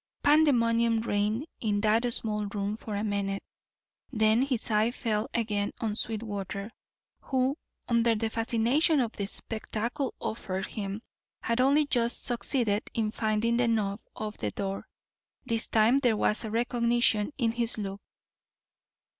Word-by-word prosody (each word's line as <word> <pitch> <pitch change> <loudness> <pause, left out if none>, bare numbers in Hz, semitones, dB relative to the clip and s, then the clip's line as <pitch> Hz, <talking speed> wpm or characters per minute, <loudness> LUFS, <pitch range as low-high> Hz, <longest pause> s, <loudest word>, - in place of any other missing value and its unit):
Pandemonium 235 -7 +4
reigned 215 +4 0
in 210 -3 0
that 225 +3 +2
small 210 -2 0
room 200 +1 -2
for 215 -1 -6
a 205 - -1
minute, 200 -2 -2 0.7
then 220 -1 +3
his 255 -4 0
eye 215 +2 +3
fell 225 0 -2
again 210 -3 -1
on 220 -2 -1
Sweetwater, 210 -2 -4 0.5
who, 260 +1 0 0.3
under 235 -1 +3
the 220 +1 -2
fascination 240 +8 +2
of 235 -4 0
the 200 -3 -4
spectacle 230 +6 -3
offered 195 -3 -3
him, 205 0 -5 0.4
had 230 +2 +1
only 285 +3 +4
just 240 -4 +1
succeeded 235 -3 0
in 220 -2 0
finding 220 +1 0
the 245 -1 +2
knob 210 -3 0 0.2
of 215 0 -5
the 105 - -1
door. 195 - -4 0.6
This 230 -1 +1
time 225 +5 +4
there 240 -5 +2
was 210 +2 +1
recognition 235 0 +2
in 235 -4 +1
his 235 0 0
look. 200 -1 -5
225 Hz, 140 wpm, -28 LUFS, 210-240 Hz, 0.7 s, Pandemonium